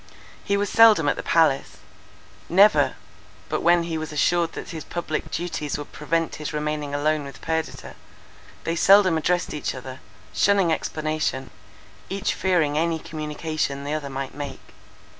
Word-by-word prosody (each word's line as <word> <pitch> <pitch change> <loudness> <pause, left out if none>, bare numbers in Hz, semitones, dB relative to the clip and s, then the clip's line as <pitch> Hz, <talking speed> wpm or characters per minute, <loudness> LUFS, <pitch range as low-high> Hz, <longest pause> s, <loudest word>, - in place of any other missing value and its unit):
He 200 - +1
was 205 0 0
seldom 215 -8 +6
at - - +2
the - - -4
palace; 160 -5 +2 0.7
never, 200 +5 +5 0.5
but - - -1
when 170 0 +4
he 165 -1 -3
was 155 0 -5
assured 165 +3 +1
that - - -7
his 160 -3 -6
public 165 -3 -4
duties 160 -4 -3
would 145 - -8
prevent 165 +2 -2
his 150 0 -5
remaining 150 -1 -2
alone 150 +1 +1
with 140 0 -10
Perdita. 160 -1 -3 0.7
They 165 - -1
seldom 190 0 +6
addressed 175 +3 0
each 150 -2 -3
other, 130 0 -8 0.3
shunning 195 -5 +3
explanation, 155 -5 -2 0.6
each 195 0 -1
fearing 160 -6 +1
any 165 0 +1
communication 150 -2 -4
the 145 +1 -3
other 150 -2 -3
might 135 0 -5
make. 145 -1 -8
155 Hz, 150 wpm, -24 LUFS, 150-170 Hz, 0.7 s, seldom